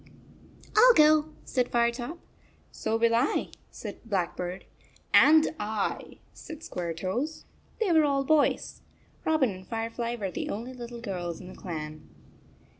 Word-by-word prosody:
"Til 485 +3 +8
go," 305 0 +5 0.2
said 250 -2 0
Firetop. 240 +6 0 0.5
"So 225 - -1
will 230 0 +3
I," 240 +4 +1 0.2
said - - -8
Blackbird. 180 -3 -3 0.5
"And 315 +1 +7
I," 210 -1 -3 0.2
said 320 -1 -10
Squaretoes. 185 - -3 0.3
They 435 -5 +1
were 320 -2 +5
all 280 -2 +2
boys. 300 +1 +1 0.4
Robin 310 -7 +3
and 185 -1 -10
Firefly 230 +1 -3
were 200 -5 -4
the - - -4
only 235 +5 -5
little 240 -1 -8
girls 175 -6 -4
in 180 - -10
the - - -11
clan. 155 -3 -7
235 Hz, 130 wpm, -28 LUFS, 190-295 Hz, 0.5 s, Til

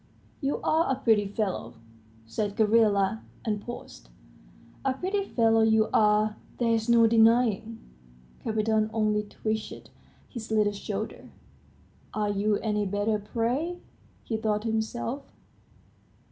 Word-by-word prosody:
"You're 275 0 -1
a 315 -4 +2
pretty 220 -6 +2
fellow," 195 - -3 0.5
said 205 - -3
Gavrila, 215 -2 +3 0.2
and 210 -2 -1
paused. - - -9 0.7
"A 265 -1 0
pretty 385 +6 -1
fellow 225 - +3
you 220 0 +3
are, 210 0 +3 0.2
there's 230 -1 +1
no 235 -1 +6
denying!" 225 -1 +3 0.7
Kapiton 220 0 +1
only 215 -1 +1
twitched 215 +1 -5 0.4
his 235 -3 -8
little 210 -2 +2
shoulders. 200 - -5 0.9
"Are 210 -1 0
you 205 +1 +1
any 210 -2 0
better, 205 +2 0
pray?" 245 - -2 0.5
he 225 - -2
thought 215 -1 -1
to 225 - -1
himself. 230 +4 -2
220 Hz, 115 wpm, -27 LUFS, 210-230 Hz, 0.9 s, no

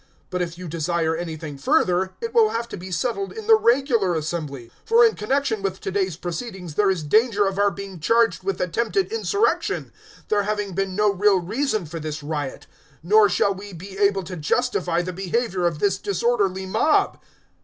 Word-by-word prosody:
019:039 - - -35 0.2
But 180 - -1
if 170 -1 -4
you 180 0 -7
desire 165 0 -1
anything 160 -3 -6
further, 190 - +2
it 460 -1 -4
will 450 -2 +5
have 235 - -3
to - - -6
be 190 0 -8
settled 245 - -2
in 440 0 -8
the 450 - +6
regular 240 - +3
assembly. 150 -6 -4 0.2
019:040 - - -31
For 465 +1 +6
in 450 - +3
connexion 225 -1 -1
with 190 -1 -2
to 195 - -4
day's 190 -4 -1
proceedings 180 -1 -6
there 200 +4 +3
is 185 -5 0
danger 210 +5 +3
of 195 0 -2
our 205 0 +4
being 195 -2 -8
charged 230 +4 +2
with 195 +1 -2
attempted 235 - 0
insurrection, 430 -2 0 0.4
there 210 -1 +3
having 205 -1 -2
been 195 +1 -2
no 210 0 +3
real 200 0 +3
reason 215 +2 -1
for 165 +2 -6
this 155 -1 -5
riot; 145 -3 -4 0.4
nor 205 +3 +5
shall 200 +2 +2
we 200 +1 -10
be 190 +3 -9
able 200 -1 +2
to 180 +1 -7
justify 175 0 0
the 185 +1 -5
behaviour 190 0 -1
of 165 -3 -2
this 195 +3 +1
disorderly 200 -2 0
mob." 300 +11 +2
195 Hz, 195 wpm, -23 LUFS, 175-225 Hz, 0.4 s, the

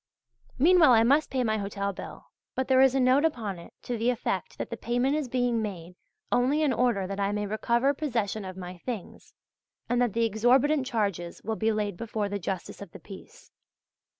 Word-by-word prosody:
Meanwhile 325 -2 +6
I 225 -1 +6
must 280 +6 +3
pay 260 -1 0
my 220 -2 0
hotel 200 0 -3
bill, - - -9 0.3
but 260 - -1
there 260 -1 +5
is 265 0 +5
a - - +3
note 260 +3 +4
upon 220 - -1
it 170 - -13
to 240 -2 -3
the 235 +2 +2
effect 245 -1 -2
that - - -5
the - - -2
payment 245 +4 0
is 305 -3 -2
being 245 -2 0
made 180 -5 -6 0.4
only 270 +5 +2
in 285 -4 +2
order 235 -6 +1
that 195 +1 -5
I 200 0 +1
may 210 0 -2
recover 235 +6 +1
possession 230 -8 -2
of 185 -1 -8
my 180 -1 -8
things, 225 -2 -7 0.5
and 245 0 +1
that 240 -5 +1
the 230 0 +2
exorbitant 255 +6 +2
charges 200 -8 -2
will 220 +2 -2
be 220 +1 +1
laid 210 -4 -2
before 215 -2 -3
the 205 0 -3
Justice 185 +1 -5
of 200 - -10
the - - -10
Peace. 435 - -13
230 Hz, 205 wpm, -27 LUFS, 200-260 Hz, 0.5 s, Meanwhile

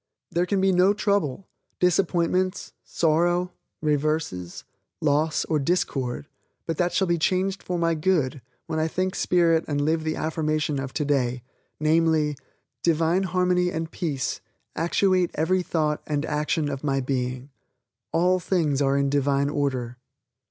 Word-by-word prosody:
There 175 +1 +1
can 200 0 +1
be 190 0 +3
no 185 +3 +4
trouble, 200 -6 0 0.3
disappointments, 180 +1 +1
sorrow, 175 +3 +1 0.3
reverses, 150 - -1 0.4
loss 150 +1 +1
or 155 - 0
discord 135 -5 -1 0.4
but 165 -2 -3
that 175 0 +1
shall 190 - +2
be 170 -2 0
changed 185 +3 0
for 180 - -3
my 165 -1 +1
good 155 -5 0 0.2
when 160 -1 -2
I 160 - +1
think 185 +3 -1
Spirit 170 -4 +2
and 145 -1 -1
live 160 +2 +1
the 155 0 -1
affirmation 155 -2 -1
of 135 -1 -4
today, 130 -5 0 0.4
namely, 155 -1 +2 0.5
"Divine 165 +2 +2
Harmony 180 0 +2
and 165 -1 -4
Peace 145 -7 -3 0.3
actuate 185 +1 +2
every 180 +4 +1
thought 155 -4 -1
and 150 0 -1
action 150 0 -1
of 140 -1 -4
my 135 -2 +1
being." 130 0 -3 0.6
All 180 +2 +3
things 160 -6 0
are 140 0 +2
in 140 0 +2
Divine 140 0 +1
order. 130 -4 -2
160 Hz, 140 wpm, -25 LUFS, 145-180 Hz, 0.6 s, no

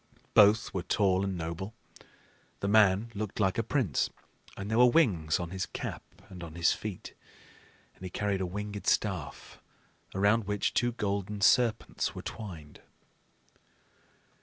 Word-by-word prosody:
Both 105 +1 +5
were 95 - -1
tall 95 0 +1
and 95 -2 -2
noble. 85 +6 -5 0.9
The 100 - -1
man 105 +1 +4
looked 105 0 -5
like 95 +1 +1
a - - +1
prince; 115 - 0 0.5
and 100 - -5
there 110 - +2
were 125 - +8
wings 95 - +2
on 85 -1 -5
his 95 +2 -3
cap - - -5 0.3
and 90 -2 -10
on 80 -1 -9
his 85 +1 +3
feet, 105 -4 -6 0.8
and - - -17
he 95 - -4
carried 100 +1 -1
a 95 - -1
winged 105 +1 -6
staff, 95 -8 -1 0.6
around 100 +3 +3
which 105 -1 0
two 120 0 +1
golden 100 -2 -2
serpents 120 +2 +2
were - - -7
twined. 85 -9 -8
100 Hz, 145 wpm, -30 LUFS, 90-110 Hz, 0.9 s, were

